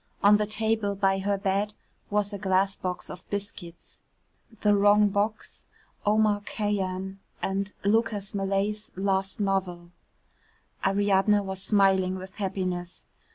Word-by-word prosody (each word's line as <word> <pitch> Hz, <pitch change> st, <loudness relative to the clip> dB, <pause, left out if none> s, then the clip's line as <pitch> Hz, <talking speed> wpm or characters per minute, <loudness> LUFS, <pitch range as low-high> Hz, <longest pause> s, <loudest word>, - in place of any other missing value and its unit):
On 205 Hz, +1 st, +7 dB
the 210 Hz, 0 st, -1 dB
table 220 Hz, -1 st, 0 dB
by 195 Hz, -1 st, +2 dB
her 200 Hz, +1 st, 0 dB
bed 200 Hz, +1 st, -1 dB, 0.3 s
was 205 Hz, 0 st, 0 dB
a 200 Hz, -, -4 dB
glass 190 Hz, 0 st, +2 dB
box 180 Hz, -1 st, -4 dB
of 180 Hz, -, -10 dB
biscuits, 195 Hz, -4 st, -6 dB, 0.6 s
"The 210 Hz, -1 st, +4 dB
Wrong 205 Hz, +1 st, +5 dB
Box," 205 Hz, +2 st, -2 dB, 0.4 s
"Omar 210 Hz, -1 st, +3 dB
Khayyam" 195 Hz, -2 st, -2 dB, 0.2 s
and 195 Hz, +1 st, -2 dB
Lucas 210 Hz, -1 st, +1 dB
Malet's 200 Hz, +2 st, -1 dB
last 195 Hz, +2 st, -1 dB
novel. 185 Hz, -4 st, -1 dB, 0.9 s
Ariadne 200 Hz, +1 st, +3 dB
was 190 Hz, -1 st, -5 dB
smiling 190 Hz, -2 st, +3 dB
with 190 Hz, 0 st, -9 dB
happiness. 185 Hz, -3 st, -3 dB
200 Hz, 120 wpm, -27 LUFS, 190-205 Hz, 0.9 s, On